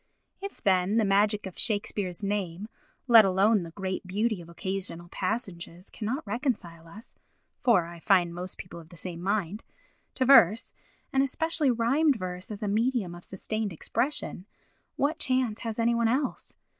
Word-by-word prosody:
If, 395 0 -8
then, 190 +2 +3
the 225 - +3
magic 205 +1 +2
of 190 - -8
Shakespeare's 205 -3 -1
name, 200 -1 -2 0.4
let 230 -3 +9
alone 195 +2 +3
the 170 - -7
great 190 +1 -4
beauty 210 +1 0
of 170 - -13
occasional 180 -1 -4
passages, 185 -3 -4
cannot 250 +8 -3
reconcile 195 - -3
us 210 +8 -13 0.5
(for 230 - +4
I 170 0 -10
find 175 -2 +3
most 180 +1 -6
people 180 - -9
of 160 -1 -14
the 175 - -14
same 170 0 -5
mind) 200 +1 -1 0.5
to 260 - +1
verse, 225 -5 +6 0.4
and 270 - +4
especially 305 +2 0
rhymed 260 +6 +3
verse 185 -3 -6
as 215 0 -6
a - - -1
medium 220 -3 0
of 175 0 -11
sustained 215 +2 -4
expression, 195 - -2 0.5
what 290 +4 0
chance 255 -5 0
has 225 -2 -4
any 235 0 +2
one 235 -1 +2
else? 260 +4 -2
205 Hz, 160 wpm, -28 LUFS, 180-235 Hz, 0.5 s, let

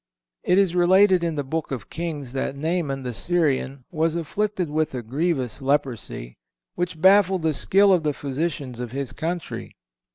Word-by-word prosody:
(463) - - 0
It - - +5
is 175 -1 -6
related 185 +1 +5
in 165 -2 -1
the 145 - -1
Book 160 +4 -3
of 135 -3 -6
Kings 150 -6 -4
that 135 0 -2
Naaman, 150 -3 -2
the 125 -1 -4
Syrian, 140 -4 0
was 165 -1 0
afflicted 185 +3 -1
with 155 -2 0
a 125 - -4
grievous 135 -1 -1
leprosy, 130 - -2 0.4
which 175 -2 -3
baffled 190 0 +5
the 160 -1 +2
skill 195 +7 +4
of 180 - +3
the 150 -1 0
physicians 140 -3 -3
of 120 -1 -5
his 135 -1 -3
country. 170 0 -5
155 Hz, 170 wpm, -24 LUFS, 135-175 Hz, 0.4 s, It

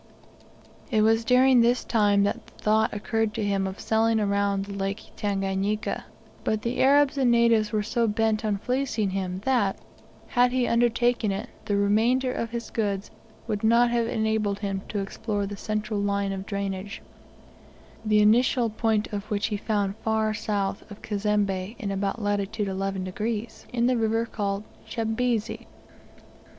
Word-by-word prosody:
It 220 -5 +3
was 225 +1 +3
during 250 +1 +5
this 240 +2 +2
time 205 -3 +3
that 220 +3 -2
the - - -19
thought 220 +1 +1
occurred 220 +1 -1
to - - -1
him 195 -1 0
of 190 +1 -7
sailing 225 0 +2
around 200 -1 0
the 200 - -7
Lake 200 +2 -4
Tanganika, 200 +1 -1 0.4
but 215 -1 -1
the 235 +1 -1
Arabs 280 +1 +4
and 260 -2 +3
natives 230 -2 +3
were 215 -2 0
so 230 +2 0
bent 220 0 +1
upon 210 -2 0
fleecing 245 -3 -1
him 185 -1 -3
that, 240 -7 +2 0.5
had 245 0 +3
he 255 -1 +2
undertaken 240 -2 +2
it, 195 +3 -4 0.2
the 205 - 0
remainder 235 +6 +2
or 230 - -2
his 235 0 -6
goods 200 -3 -2 0.3
would 210 0 -3
not 235 +2 +4
have 235 -1 +1
enabled 220 -3 0
him 195 -2 -3
to 210 - -3
explore 205 +1 -2
the 205 +1 -5
central 215 0 -2
line 200 -1 0
of 195 0 -5
drainage, 200 0 -4 1.0
the 215 -1 +3
initial 235 +1 +3
point 220 -1 +1
of 205 +1 -4
which 205 -2 0
he 210 - -1
found 200 -2 -1
far 220 -1 0
south 205 -2 -2
of 205 - -12
Cazembe's 205 -1 -1
in 210 -7 -4
about 195 +3 -2
latitude 205 0 -1
11 195 0 -2
degrees, 215 +4 -4
in 235 -1 +1
the 250 0 +2
river 225 0 +1
called 200 -3 -3 0.3
Chambezi. 230 0 -1
215 Hz, 160 wpm, -26 LUFS, 200-230 Hz, 1.0 s, during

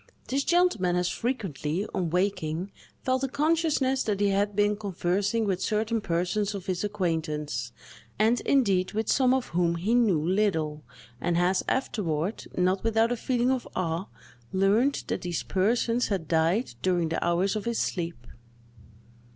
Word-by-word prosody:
This 275 +2 +1
gentleman 310 - +2
has 180 0 +1
frequently, 195 - -2
on 180 -4 -1
waking, 180 0 -1 0.3
felt 260 0 0
a - - +2
consciousness 290 -2 +1
that 205 -2 -1
he 205 0 +3
had 200 +1 0
been 205 0 +3
conversing 200 +2 -1
with 190 -2 -1
certain 220 +2 0
persons 195 +3 -1
of 190 -2 -6
his 185 -2 -2
acquaintance—and, 160 - -2
indeed, 195 -9 +2
with 220 +1 -1
some 260 -2 +4
of 260 -1 0
whom 170 0 +1
he 190 +7 0
knew 225 -9 +4
little—and 160 - -2
has 180 +2 +2
afterward, 190 - -1
not 185 +1 +1
without 225 +1 +2
a - - +1
feeling 245 +1 0
of 260 -2 -1
awe, 170 +1 -1 0.4
learned 205 +9 +2
that - - -3
these 175 -2 -3
persons 230 +5 +1
had 185 -6 -2
died 165 +9 +1
during 175 -3 +1
the 165 - -1
hours 180 +4 +1
of 215 - -3
his 235 -1 -1
sleep. 170 -9 -3
195 Hz, 150 wpm, -27 LUFS, 175-230 Hz, 0.4 s, some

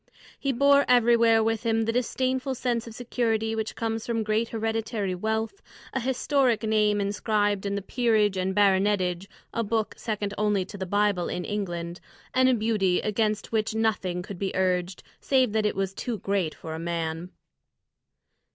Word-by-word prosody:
He 275 - 0
bore 280 +2 +5
everywhere 235 -2 +5
with 225 0 0
him 225 -1 +1
the 225 - 0
disdainful 255 +2 -1
sense 240 -2 -1
of 225 - -9
security 225 -2 -1
which 220 0 -3
comes 225 -1 -2
from 230 -2 -1
great 215 +2 0
hereditary 225 -3 -2
wealth, 220 - -2 0.3
a 265 - 0
historic 255 -2 +1
name 210 -1 +2
inscribed 205 0 0
in 200 - -1
the 200 - -3
"Peerage 220 -3 +2
and 185 0 -1
Baronetage" 195 -2 +2 0.3
a 230 - 0
book 220 0 -1
second 210 -3 -3
only 210 -3 +1
to 205 - -9
the 190 - -3
Bible 205 -2 +1
in 180 -1 -3
England 175 -4 -4 0.3
and 260 0 +4
a 255 - +4
beauty 210 -5 +1
against 215 -1 -1
which 220 -1 0
nothing 200 -5 0
could 185 -1 -8
be 195 -1 -2
urged, 185 -1 0 0.2
save 260 -4 +2
that 215 -1 +2
it - - -2
was 195 0 -2
too 235 +3 -3
great 195 -4 -1
for 160 - -7
a 160 - -5
man. 165 0 -3
215 Hz, 170 wpm, -26 LUFS, 195-230 Hz, 0.3 s, bore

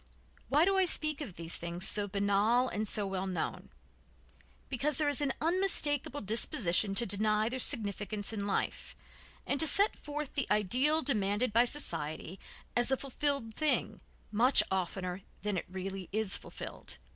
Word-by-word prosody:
Why 295 +5 +4
do 390 0 +2
I 380 - +4
speak 305 -3 -1
of 210 - -7
these 165 0 -3
things, 170 +2 -2
so 205 -1 +3
banal 205 +5 +2
and 215 -2 -3
so 205 0 0
well 190 0 -3
known? 185 - -4 1.0
Because 275 +2 -1
there 305 - +1
is 290 -1 +2
an 285 -2 +1
unmistakable 305 -5 0
disposition 205 - +1
to 235 - +4
deny 215 +2 +2
their 260 +2 -4
significance 210 -4 0
in 205 -2 -3
life, 200 - -2 0.5
and 280 - -1
to 320 - +6
set 400 +8 +4
forth 295 -1 -6
the 280 -4 -1
ideal 260 - +2
demanded 210 -2 0
by 235 +2 +5
society 165 - -3 0.4
as 240 +1 +3
a 265 - +3
fulfilled 275 -3 -2
thing 310 +5 0 0.3
much 240 +6 +5
oftener 185 0 -2 0.2
than 205 -1 -1
it 180 - -3
really 190 0 -6
is 215 -1 0
fulfilled. - - -8
220 Hz, 155 wpm, -32 LUFS, 195-285 Hz, 1.0 s, to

